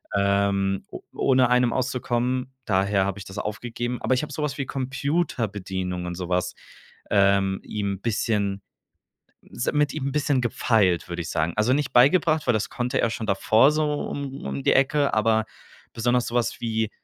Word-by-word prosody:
ähm, 100 -1 +1
o - - -8
ohne 130 -2 +3
einem 125 -1 +3
auszukommen. 125 0 -1
Daher 95 0 +2
habe 100 +1 -3
ich - - -7
das 95 +1 -10
aufgegeben. 120 +3 -4
Aber 130 - +1
ich 130 - -1
habe - - -6
so 150 - -3
was 150 - -2
wie 140 - -2
Computerbedienung 110 - -2
und 90 0 -4
so 90 0 -6
was, 90 0 0 0.6
ähm, 100 -1 +3
ihm 100 -2 -3
bisschen, 105 -3 -1 0.8
s - - -3
mit 150 0 +1
ihm 140 -3 -3
bisschen 145 -3 +1
gefeilt, 105 -7 +1
würde 85 0 -3
ich 80 - -7
sagen. 80 +2 -1
Also 115 +4 +3
nicht 140 -2 -1
beigebracht, 155 +4 +4
weil 120 - +4
das 105 - -1
konnte 125 +2 -1
er 115 - +2
schon 115 -1 -4
davor 110 +8 +4
so 155 0 +1 0.2
um 140 -1 -6
um 70 0 -4
die - - +4
Ecke, 140 +1 +2
aber 110 0 +2 0.5
besonders 120 +1 +1
so 120 - -6
was 120 -2 0
wie, 110 -2 -1
115 Hz, 175 wpm, -24 LUFS, 100-130 Hz, 0.8 s, beigebracht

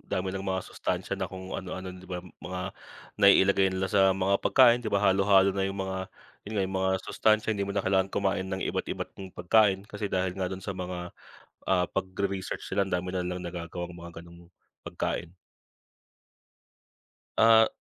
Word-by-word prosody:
dami 95 0 -3
nang 95 0 -5
mga 95 -1 -1
sustansiya - - -3
na 95 - -2
kung 95 -1 -8
ano-ano 95 0 -5
di 90 0 -12
ba, 90 -1 -4 0.2
mga 90 0 -5 0.6
naiilagay 100 -1 +6
nila 95 0 -2
sa 95 -2 +4
mga 95 +1 +1
pagkain, 120 -2 +5
di 115 - -3
ba? 100 -1 +1
Halo-halo 95 0 +5
na 95 0 0
'yung 95 0 -4
mga 95 -1 -3 0.4
'yun 105 - -6
nga, 100 - +2
'yung 95 0 -3
mga 95 0 +1
sustansiya 110 0 +2
hindi 100 -2 -2
mo 100 - -3
na 100 - 0
kailangang 95 0 +1
kumain 95 -1 0
ng 95 0 -3
iba't - - -2
iba't - - -4
'yung 95 -1 -7
pagkain, 100 0 +3
kasi 105 -1 -5
dahil 95 -1 0
nga 95 0 -2
do'n 95 0 -7
sa 100 - -3
mga, 90 -1 -5 0.6
ah, 90 -2 +3
pagre-research 95 0 -3
nila, 100 0 +2
andami 90 0 -2
nilang 90 0 -3
nagagawang 85 0 -5
mga 85 0 -9
gano'ng 85 0 -15 0.4
pagkain. 85 +1 -3 2.0
Ah 115 0 +7
95 Hz, 175 wpm, -28 LUFS, 90-100 Hz, 2.0 s, Ah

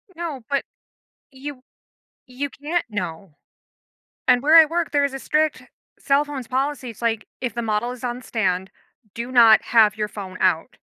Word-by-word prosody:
No, 325 -7 -5
but 280 -1 0 0.7
you 265 -1 -8 0.6
you 270 +3 -5
can't 310 +6 -3
know. 180 -3 -5 1.0
And 245 +1 +4
where 310 +3 +6
I 325 - +10
work, 330 +1 -2
there 285 -1 +2
is 275 -1 -2
a - - -4
strict 310 +2 0 0.4
cell 280 +1 +2
phones 275 -5 -7
policy. 265 -1 -2
It's 230 - -14
like, 225 -2 -1
"If 245 -4 -3
the 235 - -2
model 225 +2 -1
is 250 - -11
on 245 0 -3
stand, 190 -6 -1 0.4
do 235 +2 -5
not 230 -3 +7
have 215 -2 +4
your 210 -1 -2
phone 190 -3 -8
out." 175 -3 +1
250 Hz, 170 wpm, -22 LUFS, 215-285 Hz, 1.0 s, I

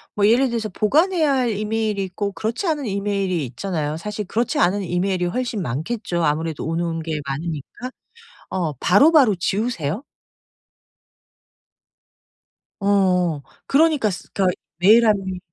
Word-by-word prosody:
뭐 205 0 +3
예를 250 +4 +4
들어서 230 -2 -2
보관해야 310 - +2
할 255 -3 +1
이메일이 215 -1 -1
있고 200 +2 -3
그렇지 225 - -3
않은 300 -4 -1
이메일이 195 -5 -1
있잖아요. 155 +3 -3
사실 210 +4 -5
그렇지 230 +5 -1
않은 190 +4 +2
이메일이 180 +1 -1
훨씬 230 +3 -2
많겠죠. 170 - -3
아무래도 155 +1 -1
오는 165 +1 -2
게 155 -2 -3
많으니까. 160 - -5 0.6
어 170 -5 -2
바로바로 245 - +5
지우세요? 195 - -2 2.8
어. 185 -6 +2 0.3
그러니까 295 -5 +3
쓰 180 - -8
그러니까 185 -2 0 0.2
메일함이 200 -1 +4
200 Hz, 310 characters per minute, -21 LUFS, 170-225 Hz, 2.8 s, 바로바로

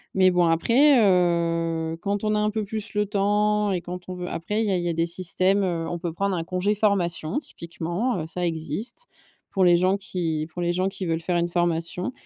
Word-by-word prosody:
Mais 185 -1 +5
bon 180 -1 +3
après 240 - +4
heu, 170 -4 +1
quand 200 +1 -2
on 215 0 +1
a - - +2
un 210 0 +2
peu 215 0 -2
plus 205 0 -5
le 210 - +2
temps 210 +1 +1
et 180 - -1
quand 180 +1 -8
on 185 - -4
veut 180 0 -5
après 210 +6 -2
il - - -1
y 200 - +1
a 185 - +2
il 175 - -2
y 175 - -1
a - - 0
des 165 +1 +1
systèmes, 185 +3 +1
heu, 170 -3 -1
on 175 - -4
peut 170 -2 -4
prendre 195 +2 -1
un 165 - -2
congé 185 +4 0
formation 190 - 0
typiquement, 175 - -3
heu, - - -4
ça 175 +2 -3
existe, 165 - -4 0.5
pour 190 - +2
les 175 -1 +6
gens 185 +3 +2
qui 165 -5 -2
pour 175 - -4
les 175 0 0
gens 185 +2 0
qui 195 -1 -5
veulent 165 0 0
faire 175 +1 0
une 170 0 0
formation. 175 +3 -1
180 Hz, 235 wpm, -24 LUFS, 170-205 Hz, 0.5 s, les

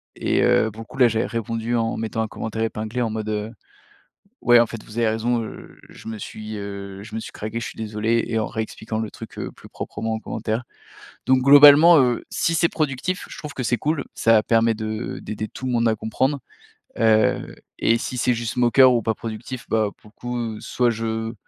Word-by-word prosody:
Et, - - 0
heu, 110 - +3
beaucoup, 110 +4 -11
là 125 -2 +6
j'avais 115 0 0
répondu 115 +1 -2
en 115 -1 0
mettant 115 0 -2
un 110 - -1
commentaire 110 +1 -5
épinglé 110 +2 -3
en 115 - 0
mode, 110 0 -4
heu: 105 +1 -3 0.9
«Ouais 120 0 +6
en - - +3
fait 115 -1 -8
vous 110 - -12
avez 115 -2 +3
raison, 115 +2 0
heu, 110 - -10
je - - -13
me 110 -1 -5
suis, 110 +1 -7
heu, 100 -1 -7
je 110 +1 -12
me - - -2
suis - - -8
craqué, 110 +2 -5
je 115 - -5
suis - - -9
désolé» 110 +1 0
et 115 -1 0
en 110 - -1
réexpliquant 110 0 -4
le 110 -2 -4
truc, - - -11
heu, - - -4
plus - - -15
proprement 115 0 -4
en - - -4
commentaire. 110 +2 -3 0.6
Donc 130 +1 +5
globalement, 145 +4 +9
heu, 125 -2 +1
si 165 - 0
c'est 170 +1 +3
productif 155 +4 -2
je - - -9
trouve 150 -2 -7
que 130 - -3
c'est 120 +1 +1
cool, 150 -2 -1
ça 115 -1 +4
permet 115 +1 +3
de 110 +1 -4
d'aider 110 0 -5
tout 130 - -10
le 130 - -1
monde 115 -1 +2
à 110 - +1
comprendre, 130 +6 -1 0.6
heu, 110 -1 +2 0.2
et 115 - +3
si 125 +2 -5
c'est 125 0 +2
juste 115 +1 -4
moqueur 125 +1 +6
ou 120 - +2
pas 110 0 0
productif, 115 +3 -7
bah, 110 -2 +2
pour 105 - -19
le - - -40 0.4
coup - - -10
soit 125 -1 +1
je 115 0 -3
115 Hz, 215 wpm, -22 LUFS, 110-120 Hz, 0.9 s, globalement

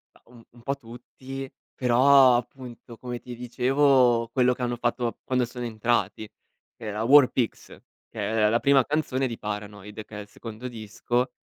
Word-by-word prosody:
Mah, - - -23
un 120 -1 -17
un 120 - -19
po' 140 +4 -2
tutti. 130 +2 -10 0.2
Però, 130 +1 +5
appunto, 120 -1 -7
come 120 0 -6
ti 125 0 -9
dicevo, 125 0 +2
quello 125 -1 +3
che 125 - -10
hanno 120 0 -1
fatto 120 0 -2
quando 125 -1 0
sono 125 0 -7
entrati. 110 -1 -1 0.5
Era 105 0 -5
War 135 +1 +7
Pigs, 120 -3 -2 0.4
che - - -10 0.3
è - - +4
la 115 +2 +2
prima 140 -1 +4
canzone 135 -3 -1
di 115 -2 -6
Paranoid, 105 0 -7
che 105 - -10
è - - -6
il 105 - -12
secondo 115 +3 -9
disco 120 +2 -2
120 Hz, 170 wpm, -25 LUFS, 115-130 Hz, 0.5 s, War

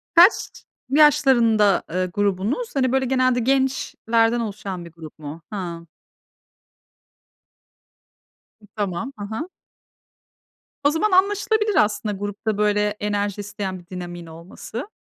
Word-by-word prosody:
Kaç 355 +5 +5 0.3
yaşlarında, 240 -8 +4
eee, 185 +2 0
grubunuz? 205 - -1
Hani, 255 -2 +2
böyle, 265 0 +1
genelde 255 -1 +2
gençlerden 240 -3 +1
oluşan 195 -5 -5
bir 170 - -12
grup 160 -2 -12
mu? 155 +2 -8
Hıı. 170 -4 -5 2.7
I - - -16
tamam. 205 +4 -3
Hı 205 - -4
hı. 220 - -5 1.3
O 285 - +5
zaman 355 +7 0
anlaşılabilir 410 +2 +2
aslında 210 0 -2
grupta 205 +2 -3
böyle 210 0 +2
enerji 205 -1 -2
isteyen 200 -2 -5
bir 175 - -18
dinamiğin 175 -1 -7
olması. 170 - -8
210 Hz, 110 wpm, -22 LUFS, 185-265 Hz, 2.7 s, Kaç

